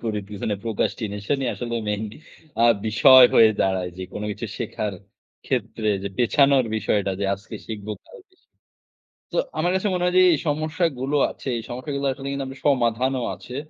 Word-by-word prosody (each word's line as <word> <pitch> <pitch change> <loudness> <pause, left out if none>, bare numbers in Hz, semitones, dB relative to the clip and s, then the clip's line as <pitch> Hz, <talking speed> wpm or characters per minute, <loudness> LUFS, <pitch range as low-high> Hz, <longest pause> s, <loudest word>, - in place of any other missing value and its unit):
করি 110 -2 -1
পিছনে 105 0 -3
procrastination 110 +1 -2 0.2
আসলে 120 -1 -4
মেইন 105 +1 -1 0.6
আ - - +4 0.2
বিষয় 130 +4 +8
হয়ে 110 - +8
দাঁড়ায় 95 -2 0
যে, 95 - -6
কোন 105 - -5
কিছু 115 +3 -5
শেখার 110 -3 -3 0.5
ক্ষেত্রে 110 -1 -2
যে, 100 - -3
পেছানোর 135 +2 +4
বিষয়টা, 100 -1 0
যে, - - 0
আজকে 100 +1 -10
শিখবো 105 -1 -5
কালকে 395 -6 -17
শিখ - - -41 0.8
তো - - -3 0.2
আমার 175 +3 +1
কাছে 190 +2 0
মনে 180 -1 -1
হয় 180 - +1
যে, - - +8
এই - - +2
সমস্যাগুলো 150 -2 -1 0.2
আছে, - - -11
এই 115 - -5
সমস্যাগুলো 140 +3 -4
আসলে 135 +1 -7
কিন্তু 140 0 -3
আমরা 130 - -7
কিন্তু 145 - -3
সমাধানও 125 0 +1
আছে। 125 - -10
125 Hz, 170 wpm, -23 LUFS, 105-140 Hz, 0.8 s, বিষয়